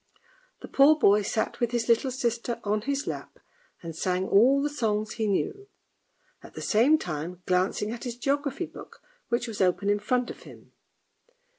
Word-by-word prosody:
The - - -6
poor 290 +3 +5
boy 210 -7 +5
sat 220 +2 -2
with 240 - +1
his 235 -1 -1
little 235 +3 +3
sister 240 -2 -2
on 210 +1 0
his 280 +4 -2
lap - - -6 0.5
and 165 -1 -7
sang 185 +2 -1
all 250 +8 +5
the 285 - +1
songs 215 -7 -1
he 220 -1 -2
knew, 400 - -2 0.7
at - - -14
the - - -6
same 245 +9 +4
time 175 - -6
glancing 185 +3 0
at 235 - -7
his 240 -1 -5
geography 280 +2 -1
book - - -13 0.3
which 240 +1 0
was 220 -3 -4
open 190 +2 +2
in 205 - +1
front 245 +4 0
of - - -12
him. - - -15
230 Hz, 175 wpm, -27 LUFS, 205-260 Hz, 0.7 s, poor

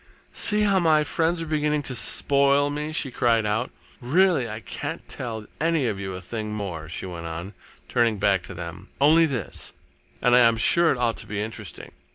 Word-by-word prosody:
"See 210 0 +3
how 200 -2 +3
my 155 -3 +3
friends 165 +2 -1
are - - -6
beginning 150 -1 0
to 135 - -2
spoil 140 +5 +4
me!" 150 +1 -4
she 150 -3 -2
cried 115 -3 +1
out. 110 +4 -1 0.3
"Really, 150 -1 +2
I 110 +1 -5
can't - - -6
tell 110 -3 -5
any 160 -2 +1
of 105 -4 -2
you 95 -1 -5
a 90 - -7
thing 105 +2 -5
more," 85 -7 -5
she 85 - -5
went 85 -2 -7
on, 85 +5 -6 0.3
turning 115 -3 +1
back 95 -1 +2
to 95 - -9
them, 90 +3 -8
"only 160 +4 +5
this, 125 - -5 0.5
and 125 0 +3
I - - +7
am 115 -2 +4
sure 170 +8 +4
it 135 - -1
ought 120 -2 0
to 110 - -7
be 100 -1 -4
interesting. 110 -2 -7
120 Hz, 200 wpm, -24 LUFS, 105-150 Hz, 0.5 s, I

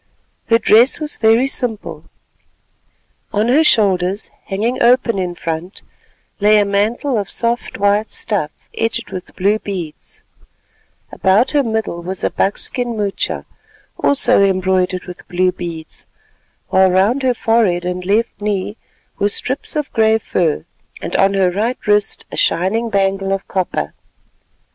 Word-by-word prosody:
Her 230 - +5
dress 230 +5 +4
was 305 -1 -3
very 225 +3 +4
simple. 245 -5 -2 1.3
On 215 +3 +1
her 295 +6 +5
shoulders, 195 - +2
hanging 225 +6 -2
open 240 -3 +3
in 180 -1 -2
front, 165 +3 -5 0.6
lay 210 +1 +5
a 205 - +3
mantle 215 +5 0
of 200 - -4
soft 235 +1 -2
white 205 +2 +2
stuff 195 -9 -1 0.3
edged 225 0 -2
with 185 0 -8
blue 205 +3 +1
beads, 180 -8 -6 0.9
about 195 +6 +2
her 290 - +3
middle 220 -8 -2
was 185 +2 -5
a - - +1
buck 195 - 0
skin 245 -2 -3
moocha, 200 -2 -2 0.6
also 255 -5 +4
embroidered 185 -1 +1
with 180 -1 -11
blue 180 +1 +1
beads, 165 -3 -5 0.6
while 190 0 +4
round 200 +9 +2
her 255 -2 +1
forehead 215 -7 +1
and 180 0 -3
left 210 +3 0
knee 205 0 -2 0.4
were 205 - +2
strips 260 +9 -1
of 300 -2 -3
grey 220 -1 +4
fur, 170 -8 -1 0.3
and - - -5
on 195 0 +3
her 190 -2 +3
right 225 +7 -1
wrist 210 -1 +1
a - - -6
shining 210 +7 +1
bangle 195 -1 0
of 195 0 -2
copper. 180 - -2
205 Hz, 140 wpm, -17 LUFS, 185-230 Hz, 1.3 s, Her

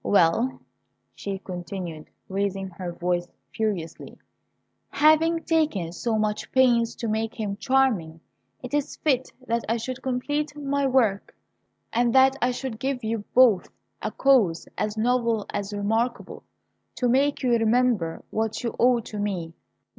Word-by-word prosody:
Well," 205 +7 +2 0.5
she 200 -1 -5
continued, 175 -3 -7 0.2
raising 195 0 -2
her 175 0 -6
voice 175 0 -1 0.3
furiously, 195 -7 -3 0.7
"having 320 +2 +3
taken 300 - 0
so 220 +6 -1
much 215 -1 -2
pains 240 -3 +3
to 230 - -4
make 220 +1 -1
him 205 -2 -2
charming, 215 -9 +1 0.4
it 250 - -7
is 290 0 -1
fit 260 -4 0
that 235 -1 -1
I 230 - +2
should 255 +3 -5
complete 290 +4 -2
my 280 -1 0
work, 230 -7 +1 0.6
and 240 +1 +2
that 265 0 +6
I 245 - +3
should 245 -2 -4
give 265 -1 -2
you 220 -1 -2
both 235 -8 +5 0.3
a - - -2
cause, 225 -12 +3
as 210 +1 -2
novel 230 -2 +1
as 200 0 -3
remarkable, 225 +4 -2 0.5
to 250 - 0
make 275 +4 +2
you 250 - +2
remember 230 -6 +2
what 220 +1 -2
you 235 - -3
owe 245 -1 +4
to 215 -1 -7
me. 180 -5 -3
230 Hz, 140 wpm, -25 LUFS, 200-255 Hz, 0.7 s, that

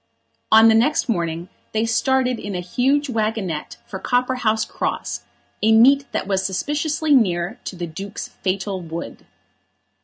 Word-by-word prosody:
On 220 +1 +8
the 225 - +6
next 245 +8 +2
morning 170 -5 -2 0.3
they 220 +1 +1
started 255 +2 +1
in 200 -1 -5
a - - -2
huge 265 +11 +1
waggonette 215 - -2
for 190 - -7
Copperhouse 245 -2 +1
Cross, - - -3 0.4
a 220 - +4
meet 270 +5 +5
that - - -2
was 190 -1 0
suspiciously 295 - 0
near 180 -8 +2
to - - -5
the 175 -1 -4
Duke's 195 +6 -7
fatal 190 0 -3
wood. 165 0 -7
220 Hz, 145 wpm, -21 LUFS, 185-250 Hz, 0.4 s, On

